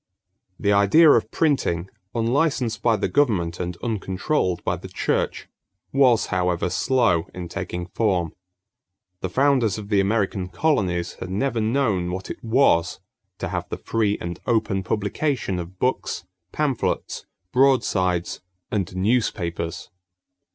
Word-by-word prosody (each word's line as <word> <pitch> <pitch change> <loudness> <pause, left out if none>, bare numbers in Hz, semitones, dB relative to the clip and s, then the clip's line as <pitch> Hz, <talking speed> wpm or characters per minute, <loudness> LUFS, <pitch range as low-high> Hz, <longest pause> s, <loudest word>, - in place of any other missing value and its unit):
= 95 - -49
The 100 -1 +2
idea 100 +11 +6
of 110 -4 +3
printing, 115 - 0 0.3
unlicensed 120 -1 +1
by 115 -2 +3
the - - -1
government 95 -12 +1
and 90 -1 -3
uncontrolled 100 - -1
by - - 0
the - - -9
church, - - -1 0.5
was, 130 -4 +4
however, 90 -1 0
slow 95 -10 +2
in 90 -1 -5
taking 90 +1 -4
form. 90 -4 0 0.9
The 95 - -3
founders 130 -1 +2
of 105 -1 -8
the 100 -2 +3
American 100 -2 0
colonies 90 - 0
had 90 - -6
never 115 +4 0
known 110 -6 +1
what 95 +1 -5
it - - -9
was 110 -8 +3 0.4
to - - -4
have - - -4
the - - -4
free 105 -2 0
and 85 0 -5
open 110 -5 +1
publication 105 +1 -1
of 90 +2 -8
books, 125 -5 -1 0.3
pamphlets, 145 -5 -2 0.2
broadsides, 95 -10 +2 0.3
and 95 -4 -2
newspapers. 95 -5 -1
100 Hz, 130 wpm, -23 LUFS, 90-125 Hz, 0.9 s, idea